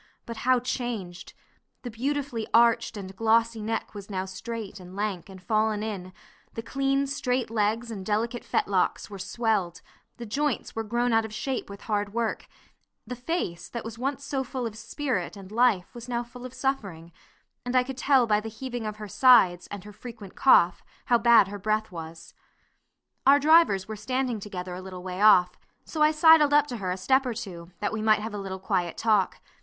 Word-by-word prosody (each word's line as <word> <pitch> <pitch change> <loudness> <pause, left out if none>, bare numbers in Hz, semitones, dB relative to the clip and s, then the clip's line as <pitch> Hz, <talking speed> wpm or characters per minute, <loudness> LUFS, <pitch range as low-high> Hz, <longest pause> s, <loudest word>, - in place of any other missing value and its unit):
but 230 -1 -7
how 255 +3 +3
changed! 230 -8 -5 0.5
The 245 - -5
beautifully 260 -1 -2
arched 230 -1 +4
and 190 -1 -8
glossy 225 +1 +2
neck 225 +2 -3
was 205 -1 -9
now 190 -2 -2
straight, 210 +1 -7
and 180 0 -12
lank, 200 -3 -3
and 190 -1 -11
fallen 215 +2 0
in; 195 -4 -5 0.4
the 225 - -4
clean 275 +1 0
straight 255 -3 -1
legs 225 +2 0
and 200 -4 -6
delicate 225 +4 -1
fetlocks 195 +1 0
were 200 - -8
swelled; 200 -3 -1 0.4
the 240 - -7
joints 280 +4 -2
were 225 - -2
grown 240 +2 0
out 225 0 +4
of 220 - -7
shape 255 +3 -3
with 200 0 -10
hard 205 -1 -2
work; 230 -2 -2 0.6
the 250 +3 -6
face, 245 - -3
that 235 - -5
was 230 +1 -7
once 275 +2 -2
so 270 -1 -2
full 255 -1 -4
of 220 -2 -5
spirit 220 - -3
and 195 0 -11
life, 220 -5 +2
was 240 0 -9
now 240 0 -1
full 245 +1 -10
of 255 - -15
suffering, 200 -12 -3 0.5
and 245 +1 -3
I 255 - +5
could 260 0 -7
tell 265 -2 +4
by 210 -2 +2
the 225 +1 -6
heaving 240 0 -5
of 210 - -4
her 215 0 -8
sides, 195 -7 +5
and 205 -2 -8
her 210 0 -11
frequent 220 -3 -10
cough, 180 -9 +4 0.2
how 240 -1 +3
bad 230 -4 +6
her 205 0 -7
breath 215 +1 -1
was. 165 -1 -9 0.9
Our 280 +1 +8
drivers 295 - +4
were 215 - -5
standing 255 +1 -2
together 185 -3 -6
a 180 - -6
little 185 -1 -9
way 185 +1 -5
off, 180 -4 +5 0.3
so 310 - -5
I 305 - +7
sidled 310 -2 +6
up 295 - +5
to 245 - -4
her 190 -3 -3
a 180 - -2
step 265 +8 +2
or 250 -3 -3
two, 170 -5 -7
that 205 - -1
we 220 - -2
might 215 0 +4
have 220 0 -5
a 205 - -4
little 190 -1 -5
quiet 185 -3 -2
talk. 210 -4 +1
220 Hz, 200 wpm, -26 LUFS, 195-250 Hz, 0.9 s, Our